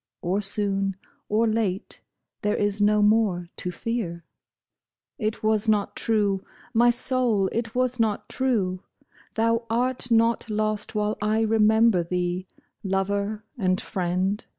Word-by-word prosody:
Or 185 +4 0
soon 195 -1 +2 0.3
or 220 +2 +2
late, 215 -4 -2 0.4
there 210 0 0
is 205 0 0
no 210 0 +4
more 205 -5 +2
to 180 - -4
fear." 180 -4 -4 0.9
It 215 -2 -2
was 215 0 +2
not 205 -2 +1
true, 205 -4 0 0.3
my 240 +1 +5
soul! 240 -5 +1
it 230 0 -3
was 255 0 0
not 220 -2 0
true! 205 -9 -1 0.3
" - - -30
Thou 230 +1 +1
art 245 +2 0
not 230 0 +2
lost 215 0 -1
while 210 0 -1
I 215 +1 +1
remember 220 -3 +4
thee, 180 +1 -2 0.4
Lover 200 +2 -1 0.2
and 185 -2 +1
friend 185 +3 -1
210 Hz, 130 wpm, -25 LUFS, 195-225 Hz, 0.9 s, my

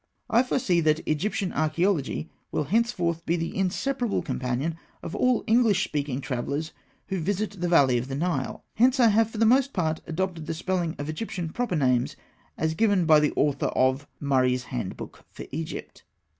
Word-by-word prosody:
I 230 - +6
foresee 235 -8 +1
that 155 0 +1
Egyptian 185 +4 -1
Archaeology 155 0 0 0.2
will - - 0
henceforth 175 - 0
be 170 - +1
the 165 -1 -3
inseparable 230 +5 -1
companion 130 +6 -2 0.3
of 165 - -6
all 250 +2 +2
English 220 -4 +3
speaking 140 -4 -2
travellers 140 +5 -3 0.4
who 190 - -1
visit 200 +2 -2
the 175 - +1
Valley 135 -7 +5
of 120 - -5
the 135 - -4
Nile; 150 -3 -2
hence 255 +4 +3
I 235 -2 +6
have 220 +1 +3
for 225 - -9
the 225 - +3
most 265 +4 +4
part 160 -4 -1
adopted 170 -1 -3
the 165 - -2
spelling 175 -1 -1
of 145 - -5
Egyptian 170 +1 -4
proper 240 +1 -2
names 125 -5 +1 0.4
as 160 0 0
given 200 -1 +2
by 155 -2 +7
the 150 0 +2
author 145 -1 +1
of 130 +2 +1
"Murray's 130 -3 +2
Handbook 120 -8 -6
for - - -9
Egypt." 160 +2 -6
165 Hz, 170 wpm, -26 LUFS, 145-205 Hz, 0.4 s, by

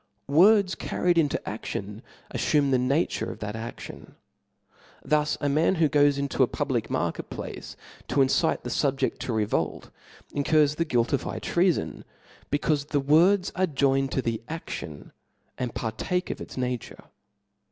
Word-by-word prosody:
Words 185 +6 +5
carried 175 -1 0
into 145 -4 +1
a<Slion 105 +2 -5 0.3
afiiime 145 -3 +2
the 130 - +3
nature 135 +7 0
of - - -9
that 105 -1 -5
a6lion. 115 +1 -8 0.9
Thus 150 0 +1
a 145 - -1
man 155 +6 +2
who 165 -2 +3
goes 145 -1 +3
into 140 0 -1
a - - +6
public - - -2
market - - -2
place - - -7 0.3
to 140 - +3
incite 150 +5 +1
the - - -5
fubjedt 135 -2 0
to - - -3
revolt, 110 -2 -1 0.4
incurs 145 0 +3
the 165 +2 -1
guilt 120 -5 +1
of 140 - +2
high - - -5
treafon, 175 -1 0 0.5
becaufe 145 0 0
the 145 - +1
words 170 +7 +4
are 185 +2 +2
joined 135 -2 +1
to 130 - 0
the 115 -1 -2
adlion, 120 - -7 0.5
and 125 -2 -3
partake 180 +11 -2
of - - -6
its - - -9
nature. 125 -2 -4
145 Hz, 150 wpm, -26 LUFS, 125-160 Hz, 0.9 s, a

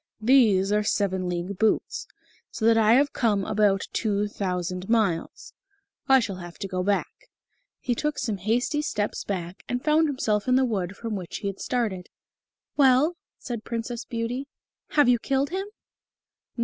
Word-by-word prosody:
These 215 -5 +4
are 210 0 +3
seven 190 -3 0
league 180 +2 -4
boots 455 - 0 0.4
so 220 - -4
that 230 0 +6
I 220 0 +5
have 285 +4 +3
come 210 -5 +1
about 205 -2 +2
two 210 -2 0
thousand 180 -2 -3
miles. 205 -8 0 0.5
I 270 -1 +6
shall 205 -6 -3
have 175 -1 -9
to 195 - -5
go 185 -1 -2
back." 200 +2 -2 0.5
He 245 - -1
took 300 +5 -2
some 215 -4 -2
hasty 240 - 0
steps 210 -9 -2
back, 180 -2 -5
and 245 +1 -2
found 310 +1 +4
himself 220 -7 -1
in 255 - +4
the 260 0 +4
wood 195 -5 -2
from 225 -2 -4
which 180 -4 -5
he 200 - -4
had 195 - -8
started. 215 -8 -2 0.7
"Well?" 280 +4 +4 0.2
said 235 -4 -6
Princess 230 0 -4
Beauty, 240 +4 -4 0.4
"have 290 -4 +3
you 245 -1 +4
killed 275 +4 0
him?" 385 +2 -3
220 Hz, 160 wpm, -25 LUFS, 195-255 Hz, 0.7 s, that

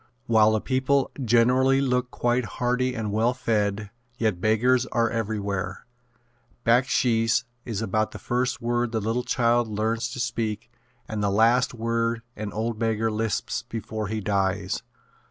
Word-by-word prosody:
While 110 -2 +4
the 110 - +1
people 135 +1 +1
generally 125 +3 +4
look 125 -2 0
quite 120 0 0
hearty 125 +1 0
and 110 -3 -3
well 115 +4 +1
fed, 105 -4 -1 0.3
yet 110 -7 0
beggars 120 +4 +3
are 115 -1 +1
everywhere. 100 -4 -3 0.8
"Backsheesh" 115 -1 +3 0.2
is 110 -4 -3
about 110 +1 0
the - - -9
first 125 +1 -1
word 120 0 0
the 110 - +1
little 115 +4 -1
child 120 -1 +2
learns 110 +2 -1
to - - -6
speak 115 -3 -3 0.4
and 110 -1 -3
the 100 - +1
last 115 +5 +3
word 115 0 -1
an 105 -1 -5
old 110 +1 -3
beggar 115 -1 0
lisps 110 -1 -2
before 110 -2 -4
he 110 +1 -3
dies. 95 -1 0
115 Hz, 145 wpm, -25 LUFS, 110-125 Hz, 0.8 s, While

